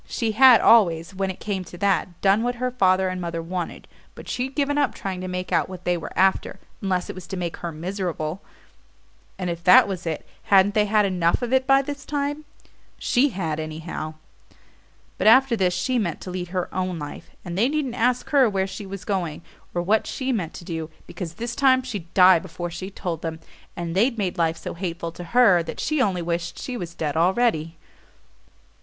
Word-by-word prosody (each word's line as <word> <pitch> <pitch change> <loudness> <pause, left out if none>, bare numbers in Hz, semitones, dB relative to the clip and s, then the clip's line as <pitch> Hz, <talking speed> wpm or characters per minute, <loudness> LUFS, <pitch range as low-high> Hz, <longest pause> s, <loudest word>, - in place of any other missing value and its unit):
She 230 -2 -1
had 255 +1 +7
always, 170 -6 +4
when 190 0 -2
it 185 - -6
came 195 -3 -3
to 175 - -11
that, 185 -2 0
done 200 +2 +4
what 245 +1 -1
her 250 +1 -2
father 190 -5 +3
and 185 0 -3
mother 170 -1 -3
wanted, 175 +1 -5 0.3
but - - -11
she'd 260 +2 -3
given 285 -1 +1
up 285 - +1
trying 190 -2 -4
to 185 - -4
make 180 0 -4
out - - +1
what 185 -1 -9
they 180 - +2
were 170 - -6
after, 190 0 +2 0.2
unless 185 -2 -1
it - - -5
was 185 -2 -10
to 190 - -5
make 175 -2 -3
her 170 - -5
miserable; 175 0 -4 1.0
and 185 - -3
if 170 0 -6
that 180 +2 +7
was 185 -3 -5
it, 160 - -3 0.2
hadn't 200 0 +5
they 210 -1 +2
had 210 0 +3
enough 180 +2 +1
of 245 +1 -2
it 260 0 +3
by 270 0 +5
this 285 0 -6
time? 290 +1 -3 0.5
She 270 +4 +2
had, 165 - -3
anyhow. 155 0 -5 1.0
But - - +2
after 260 +2 +6
this 185 -4 +1
she 255 -2 0
meant 175 -7 -2
to 185 - -7
lead 180 -1 -4
her 180 0 -2
own 185 -1 -2
life; 145 -2 -8 0.2
and 175 -1 -5
they 225 +7 +2
needn't 290 -4 -1
ask 245 +1 0
her 270 -5 +5
where 190 -2 0
she 195 +1 -7
was 195 -1 -8
going, 175 -6 -2 0.3
or 175 - -2
what 210 +4 +2
she 265 0 -2
meant 180 -9 -2
to 170 - -9
do, 160 -3 -4 0.2
because 170 -3 -7
this 235 +1 -4
time 260 -2 +4
she'd 205 -10 -6
die 185 -2 +7
before 175 0 -6
she 185 +3 -6
told 175 -5 -5
them 160 -1 -4 0.4
and 170 0 -4
they'd 235 +5 +2
made 185 -4 -2
life 165 -1 +1
so - - -6
hateful 170 -1 -4
to 175 +1 -9
her 200 -3 +5
that 165 - -7
she 305 -3 0
only 185 -7 +1
wished 170 0 -3
she 255 - -5
was 170 -6 -6
dead 150 -3 -2
already. 170 -2 +1
185 Hz, 210 wpm, -24 LUFS, 170-230 Hz, 1.0 s, had